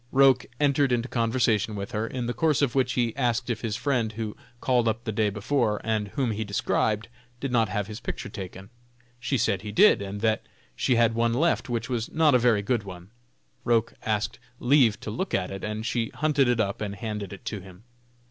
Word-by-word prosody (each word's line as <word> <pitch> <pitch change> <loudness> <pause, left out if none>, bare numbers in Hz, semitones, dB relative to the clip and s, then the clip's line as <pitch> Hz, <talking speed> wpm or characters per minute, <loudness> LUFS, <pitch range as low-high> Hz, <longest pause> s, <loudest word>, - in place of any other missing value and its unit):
Roch 135 -1 +5
entered 140 -2 +3
into 120 0 +1
conversation 115 -3 +1
with 100 +2 -5
her, 110 0 -1
in 125 0 -4
the 120 - -1
course 150 +3 +2
of 130 -4 +1
which 130 -1 +1
he 120 -3 0
asked 120 -2 0
if 110 - -3
his 110 -3 -2
friend 125 -3 0
who 110 -1 -4 0.2
called 125 -2 +2
up 110 +1 -1
the 110 - -2
day 105 0 +1
before, 105 +1 0
and 110 -2 0
whom 125 +2 -1
he 110 +1 -2
described, 105 +1 0 0.3
did 135 0 -3
not 115 -4 +2
have 105 +1 -1
his 105 +2 -7
picture 125 - -5
taken. 95 0 -8 0.5
She 135 +2 0
said 105 -5 +1
he 105 0 -6
did, 105 - +5
and 100 +1 -5
that 110 -1 +1 0.3
she 125 - +2
had 115 -1 +4
one 115 0 +1
left, 165 0 +1
which 115 -1 -2
was 120 -3 -2
not 155 -2 +4
a 125 - +5
very 115 -4 +3
good 120 +1 +1
one. 95 -1 -10 0.5
Roch 115 0 +2
asked 110 -2 -1 0.2
leave 120 -4 +4
to 105 - -5
look 190 - -2
at 90 0 -1
it, 95 - -6
and 110 +1 -3
she 115 -1 -1
hunted 145 -3 +2
it 120 -1 +2
up 100 -1 -1
and 100 -1 -3
handed 105 -3 -5
it 100 - -10
to 105 - -3
him. 95 +1 -14
115 Hz, 215 wpm, -26 LUFS, 105-125 Hz, 0.5 s, Roch